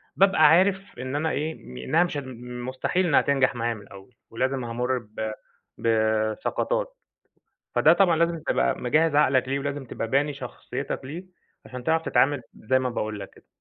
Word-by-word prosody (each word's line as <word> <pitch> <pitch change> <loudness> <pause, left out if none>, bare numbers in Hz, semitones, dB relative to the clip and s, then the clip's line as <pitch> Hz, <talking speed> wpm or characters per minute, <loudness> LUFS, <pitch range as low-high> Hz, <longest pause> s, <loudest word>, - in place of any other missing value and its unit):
بابقى 190 -5 +5
عارف 190 -1 +3
إن 130 +2 -4
أنا 160 +2 0
ايه، 155 +2 -2 0.3
إنها 165 +6 +3
مش 175 -4 -3
هت 140 - -3 0.4
مستحيل 180 +8 0
إنها 145 - +5
تنجح 135 -2 +2
معايا 115 0 -1
من 105 - -10
الأول، 100 +4 -15
ولازم 130 +2 -1
هامر 125 +2 -1
ب 110 -1 -5 0.5
بسقطات، 110 - 0 0.8
فده - - +6
طبعًا 180 -4 +4
لازم 170 0 +1
تبقى 60 0 +1
مجهز 155 +5 +2
عقلك 130 -3 +3
ليه، 135 - 0
ولازم 140 0 -4
تبقى 115 - -4
باني 140 +4 +1
شخصيتك 135 +1 -5
ليه 170 +7 -7 0.4
عشان 125 -1 -8
تعرف 160 0 +2
تتعامل 145 -5 +2
زي 130 +4 +1
ما 130 -1 -1
باقول 105 -3 -3
لك 100 - -8
كده. - - -21
135 Hz, 170 wpm, -25 LUFS, 120-160 Hz, 0.8 s, فده